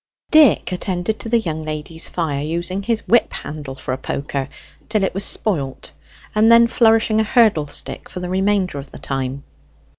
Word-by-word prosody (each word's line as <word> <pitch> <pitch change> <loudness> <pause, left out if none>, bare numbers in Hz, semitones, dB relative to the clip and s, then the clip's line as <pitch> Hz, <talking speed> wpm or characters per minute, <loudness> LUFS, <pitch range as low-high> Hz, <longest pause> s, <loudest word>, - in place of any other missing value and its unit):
Dick 305 - +5
attended 185 +3 -2
to 225 - -5
the 235 - +3
young 160 -7 -4
lady's 155 +1 -5
fire, 150 -5 -2
using 170 +5 -2
his 225 +2 -2
whip 240 +1 +3
handle 145 -3 -7
for 130 -1 -4
a 130 - -4
poker 140 0 -4 0.4
till 215 -2 +1
it 190 - 0
was 195 +2 -1
spoilt, 145 -12 0 0.4
and 220 +2 +4
then 235 0 +8
flourishing 225 -1 +3
a - - +3
hurdle 215 -9 +3
stick 145 - -6
for 180 - -7
the 180 - -4
remainder 190 -4 0
of 140 - -10
the - - -11
time. 135 0 -4
180 Hz, 180 wpm, -20 LUFS, 145-215 Hz, 0.4 s, then